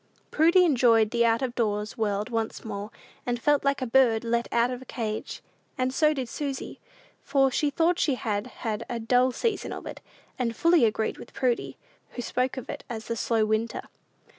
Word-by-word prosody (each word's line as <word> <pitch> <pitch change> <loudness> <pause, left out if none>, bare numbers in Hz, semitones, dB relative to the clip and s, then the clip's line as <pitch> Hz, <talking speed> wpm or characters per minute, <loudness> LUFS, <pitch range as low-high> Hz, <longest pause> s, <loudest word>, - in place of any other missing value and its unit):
Prudy 340 +4 +5
enjoyed 230 -7 +4
the 235 -1 +2
out 230 +3 +2
of 250 -2 -2
doors 210 -3 -1
world 210 -1 -1
once 225 -1 -3
more, 205 -1 -5 0.3
and 240 -1 -2
felt 290 +3 +2
like 275 -1 +1
a - - 0
bird 235 -2 +3
let 235 0 0
out 235 +1 +2
of 250 0 -5
a - - -11
cage. 220 -4 -4 0.3
And 255 0 0
so 305 +2 +4
did 265 -5 -3
Susy, 275 +2 -5 0.4
for 275 -1 +2
she 295 +3 +1
thought 330 +5 +1
she 280 - +2
had 210 -2 -2 0.2
had 215 -2 -1
a 235 - -3
dull 250 +3 +3
season 455 - -2
of - - -7
it, - - -8 0.4
and 230 -2 -1
fully 335 -3 +4
agreed 220 0 -1
with - - -12
Prudy, 250 -3 -1 0.4
who 245 - -5
spoke 255 +3 -1
of 260 - -6
it - - -6
as 225 -2 -5
the 230 - -3
"slow 225 -1 +1
winter." 220 +2 -1
240 Hz, 195 wpm, -27 LUFS, 225-265 Hz, 0.4 s, Prudy